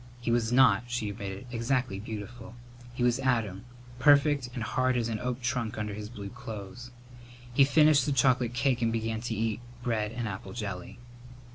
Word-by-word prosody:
He 120 -1 -1
was 115 -1 +1
not, 120 -3 +5
she 120 -4 -2
admitted, 100 +1 -6
exactly 120 -3 -1
beautiful. 110 +2 -7 0.4
He 125 - -1
was 125 +1 +3
Adam, 115 -6 0 0.3
perfect 145 -1 +4
and 120 - -3
hard 130 +2 +1
as 115 -1 0
an 110 -1 -2
oak 125 +2 -3
trunk 120 -4 -1
under 105 -1 -3
his 105 +1 -6
blue 100 -4 -7
clothes. 110 +4 -8 0.6
He 135 - +6
finished 150 -1 +5
the - - +1
chocolate 125 -2 +2
cake 125 -1 +1
and 115 -1 +2
began 115 -1 -2
to 120 -1 -3
eat 110 0 -1 0.2
bread 110 -3 0
and 120 -1 -3
apple 95 -1 -6
jelly. 100 -6 -5
120 Hz, 175 wpm, -29 LUFS, 105-125 Hz, 0.6 s, He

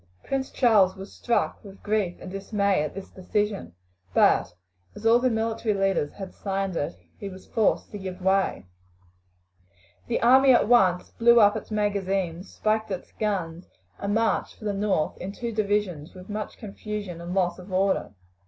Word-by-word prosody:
Prince 270 -1 -2
Charles 205 -6 +4
was 195 +1 -10
struck 235 - -1
with 200 -1 -13
grief 205 -4 0
and - - -8
dismay 200 -2 0
at 155 - -4
this 195 -1 -8
decision, 200 - -2 0.4
but 90 - +4 0.4
as 225 - -10
all 230 +1 +6
the 255 +1 +2
military 225 -1 -1
leaders 195 -7 0
had 195 -2 -8
signed 195 -2 -3
it 145 - -2 0.2
he 200 - -5
was 185 0 -12
forced 220 -4 0
to 205 - -6
give 185 -1 -6
way. 190 - +1 1.4
The 235 - 0
army 260 +2 +7
at 240 - +4
once 185 -7 +3
blew 235 0 +5
up 205 -2 +6
its - - -6
magazines, 195 -4 -1
spiked 220 0 0
its 185 -2 -5
guns, 180 -5 -3 0.3
and 200 +1 -1
marched 225 0 0
for 215 - -11
the 205 - 0
north 195 -6 0
in 190 +2 -5
two 235 +2 -4
divisions 205 -7 -1
with 185 +2 -12
much 210 0 -5
confusion 205 -4 -6
and 175 +2 -5
loss 180 -2 +1
of 180 +2 -11
order. 190 - 0
200 Hz, 170 wpm, -26 LUFS, 185-215 Hz, 1.4 s, army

